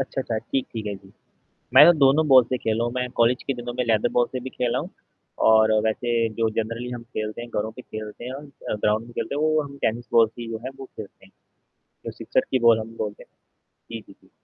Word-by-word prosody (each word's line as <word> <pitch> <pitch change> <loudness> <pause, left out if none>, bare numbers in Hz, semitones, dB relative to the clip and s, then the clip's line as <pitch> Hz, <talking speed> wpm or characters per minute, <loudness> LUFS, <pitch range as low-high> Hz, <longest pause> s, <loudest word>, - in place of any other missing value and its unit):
अच्छा, 135 0 -3
अच्छा, 115 -4 -2
ठीक 130 +4 -2
ठीक 110 -2 -5
है 105 - -3
जी। 95 0 -19 0.6
मैं - - +11
तो 175 - +8
दोनों 140 +3 +4
बॉल 130 -2 +8
से 125 +2 -2
खेला 110 0 -1
हूँ। 120 - -2
मैं 125 0 -2
कॉलेज 120 +2 +3
के 135 - 0
दिनों 120 0 -6
में 125 - +1
लेदर 110 -2 +2
बॉल 120 -1 +3
से 130 - -3
भी 130 +1 -7
खेला 125 -2 -1
हूँ, - - -5 0.5
और 110 0 +5
वैसे 120 +2 -1 0.2
जो 115 +1 +1
जनरली 115 +2 -5
हम 120 -1 -6
खेलते 110 -2 -5
हैं 120 - -9
घरों 110 -1 -2
पे 125 - -11
खेलते 110 0 -8
हैं 125 - -5
और 140 +3 -8
अ, 140 -5 -7
ग्राउंड 105 +1 0
में 120 - -13
खेलते - - -4
हैं 145 - -1
वो 155 0 +3
हम 140 -1 -10
टेनिस 120 +2 -1
बॉल 115 -1 +6
की 120 -1 -7
जो 110 - -4
है 130 - -4
वो 135 - -7
खेलते - - -12
हैं। - - -23 0.8
जो - - -4
सिक्सर - - 0
की 130 - +2
बॉल 115 -1 +6
हम 115 +1 -8
बोलते 105 -1 -5
हैं। - - -28 0.6
जी, - - -5
जी, - - -17
जी। - - -25
120 Hz, 255 wpm, -24 LUFS, 110-130 Hz, 0.8 s, मैं